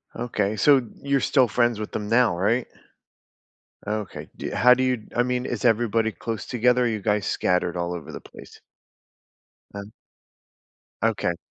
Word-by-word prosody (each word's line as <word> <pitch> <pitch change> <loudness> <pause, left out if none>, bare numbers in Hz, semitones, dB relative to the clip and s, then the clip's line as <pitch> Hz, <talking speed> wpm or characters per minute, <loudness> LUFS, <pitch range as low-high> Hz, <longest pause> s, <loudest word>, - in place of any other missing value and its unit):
Okay, 105 -3 -2
so 130 +3 +4 0.2
you're 140 0 +1
still 130 -3 +2
friends 120 0 +1
with 105 - -6
them 105 - -4
now, 115 -4 +3
right? 110 +7 +1 1.2
Okay, 105 -1 -5
do - - -6
you - - -4
how 125 +1 +6
do 130 - -1
you 125 -4 -1
I 120 - +4
mean, 125 0 -2
is - - -4
everybody 115 -1 +2
close 110 +3 -5
together, 125 +1 +2
or - - +2
are - - +2
you 110 -2 -2
guys 105 0 0
scattered 90 -1 0
all 85 0 -2
over 85 - -8
the - - -7
place? - - -15 1.1
None 100 +1 -8 1.1
Okay. 105 -6 0
115 Hz, 165 wpm, -24 LUFS, 105-125 Hz, 1.2 s, how